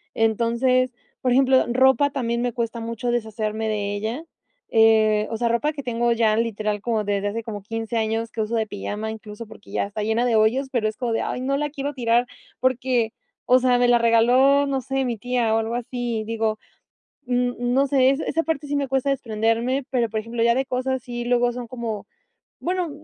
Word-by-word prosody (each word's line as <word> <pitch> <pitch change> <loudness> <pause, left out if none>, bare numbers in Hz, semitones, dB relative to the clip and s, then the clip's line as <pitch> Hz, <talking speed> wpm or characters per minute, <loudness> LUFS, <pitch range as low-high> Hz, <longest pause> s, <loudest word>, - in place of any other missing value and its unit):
Entonces, 235 +3 +2 0.3
por 255 - +1
ejemplo 260 0 +4
ropa 265 +3 +4
también 235 -4 -2
me 245 -1 0
cuesta 230 0 -3
mucho 230 +1 -3
deshacerme 220 -1 -2
de 205 -1 -2
ella, 225 +10 -4 0.4
eh, 220 -1 +4
o 225 - -3
sea, 240 0 0
ropa 235 +6 +1
que 290 -2 -7
tengo 240 -1 0
ya 225 -2 +3
literal 215 -2 -1
como 220 -3 -1
desde 205 0 0
hace 225 +2 -4
como 210 -3 -6
15 225 +2 -4
años 225 +1 -1
que 220 - -3
uso 220 +2 -2
de 220 -1 0
pijama 210 +2 -4
incluso 215 0 -9
porque 215 -1 -14
ya - - 0
está 210 +1 -5
llena 225 +3 +1
de 235 -2 +2
hoyos, 235 +6 +3
pero 215 -3 +1
es 215 - -9
como 240 -3 -2
de: - - 0
"Ay - - -3
no 275 +2 0
la 295 +1 -1
quiero 285 0 -4
tirar" 240 -1 +2 0.3
porque, 250 -2 +1 0.4
o 255 - +8
sea, 250 -1 +3
me 245 - +4
la 240 0 +5
regaló, 250 +5 +4
no 270 -1 -1
sé, 270 +1 -1
mi 235 -2 -2
tía 240 -1 0
o - - +3
algo 225 +1 -2
así. 240 -2 -3
Digo, 220 -1 -1 0.7
n 245 0 0
no 250 +3 +2
sé, 265 -1 +4 0.2
esa 330 +2 0
parte 315 -3 -2
sí 290 - -2
me 280 -2 0
cuesta 270 +1 0
desprenderme, 235 +2 0
pero 240 -3 +1
por 220 0 -3
ejemplo 230 +1 -3
ya 235 0 +4
ve 265 +1 0
cosas 255 0 -2
y 240 0 -3
luego 245 0 +2
son 245 -1 -6
como 230 -3 -5 0.5
bueno, 360 -2 -1
235 Hz, 205 wpm, -23 LUFS, 220-255 Hz, 0.7 s, o